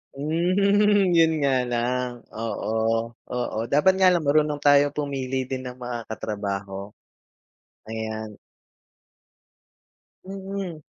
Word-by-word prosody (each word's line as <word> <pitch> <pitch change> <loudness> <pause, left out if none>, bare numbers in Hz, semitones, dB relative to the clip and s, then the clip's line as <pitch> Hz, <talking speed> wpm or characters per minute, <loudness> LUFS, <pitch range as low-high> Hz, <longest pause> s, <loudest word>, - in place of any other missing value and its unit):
Hmm, 195 +6 +3
yun 165 -1 +5
nga 140 -1 +2 0.2
lang 125 +1 0 0.3
oo, 115 -1 -3 0.6
oo 125 -3 -2 0.2
dapat 190 +6 +5
nga 190 -1 +6
lang 170 - +1
marunong 150 0 +2
tayo 145 0 +5
pumili 135 -3 -2
din 130 -1 -4
ng 125 - -5
mga 120 -2 -5
katrabaho. 100 -1 -5 1.0
Ayan. 110 -1 -5 1.9
Mm. 195 -4 -6
140 Hz, 100 wpm, -24 LUFS, 115-170 Hz, 1.9 s, nga